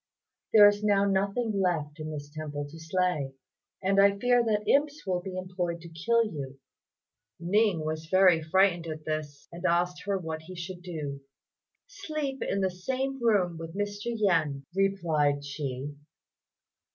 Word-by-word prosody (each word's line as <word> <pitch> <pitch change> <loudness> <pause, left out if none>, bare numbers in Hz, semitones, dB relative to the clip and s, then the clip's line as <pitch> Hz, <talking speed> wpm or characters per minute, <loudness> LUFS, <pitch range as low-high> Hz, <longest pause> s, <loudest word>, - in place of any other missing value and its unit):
There 210 -2 +9
is 205 0 +1
now 200 -1 +3
nothing 200 +2 0
left 155 -4 -1
in 155 0 -5
this 145 -1 -7
temple 145 -2 -4
to 165 - -10
slay, 160 -5 -1 0.5
and 195 +1 +3
I 200 0 +5
fear 245 +2 +3
that 210 -2 0
imps 290 +1 +2
will 180 -2 0
be 185 0 -6
employed 180 -2 -3
to 170 - -10
kill 230 +9 +2
you." 140 -8 -6 0.8
Ning 180 -1 +2
was 155 0 -3
very 185 -1 +5
frightened 175 +1 +2
at 155 -1 -6
this, 155 -2 -4
and 170 +1 -9
asked 175 +1 +1
her 200 -1 +1
what 160 -3 -5
he 185 +3 -10
should 175 +1 -7
do. 150 -6 -5 0.6
"Sleep 305 - -4
in 195 - -1
the 190 -1 +1
same 265 +8 -3
room 190 -8 +2
with 165 +1 -7
Mr. 205 0 -3
Yen," 165 -12 +1
replied 160 -8 +1
she. 140 -1 -5
180 Hz, 155 wpm, -28 LUFS, 155-205 Hz, 0.8 s, There